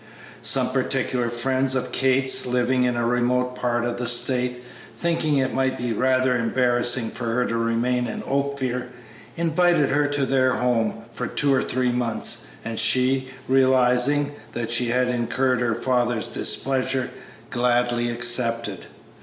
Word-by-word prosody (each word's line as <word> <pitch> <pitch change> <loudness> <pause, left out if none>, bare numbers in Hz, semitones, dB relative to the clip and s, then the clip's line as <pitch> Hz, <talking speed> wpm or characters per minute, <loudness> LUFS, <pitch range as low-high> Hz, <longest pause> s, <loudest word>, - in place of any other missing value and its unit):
Some - - +1
particular 125 -2 -1
friends 130 +2 +1
of 125 -1 -2
Kate's, 130 0 +2
living 125 +1 +1
in 125 -1 0
a 120 0 -1
remote 125 +1 0
part 120 -1 -1
of 120 0 -3
the 125 - -2
State, 125 0 0 0.3
thinking 165 -4 0
it 130 -1 0
might 130 0 0
be 120 -2 -2
rather 130 +2 +2
embarrassing 120 0 +1
for 125 - -6
her 120 +2 0
to 115 - -2
remain 115 +2 0
in 110 - -5
Ophir, 140 -3 -2 0.5
invited 170 -2 +2
her 145 +1 +2
to 145 -1 -1
their 130 -1 +2
home 125 -3 0
for - - -4
two 140 -2 +1
or 130 - +2
three 125 0 0
months, 120 -2 0 0.2
and 115 -1 -3
she, 130 +1 +2 0.2
realizing 130 +2 +3 0.2
that 115 -1 -3
she 120 +1 +1
had 125 +2 +1
incurred 125 +1 0
her 115 -2 0
father's 120 -1 0
displeasure, 130 -1 -1 0.4
gladly 120 -1 +1
accepted. 115 -4 -1
125 Hz, 145 wpm, -23 LUFS, 120-130 Hz, 0.5 s, realizing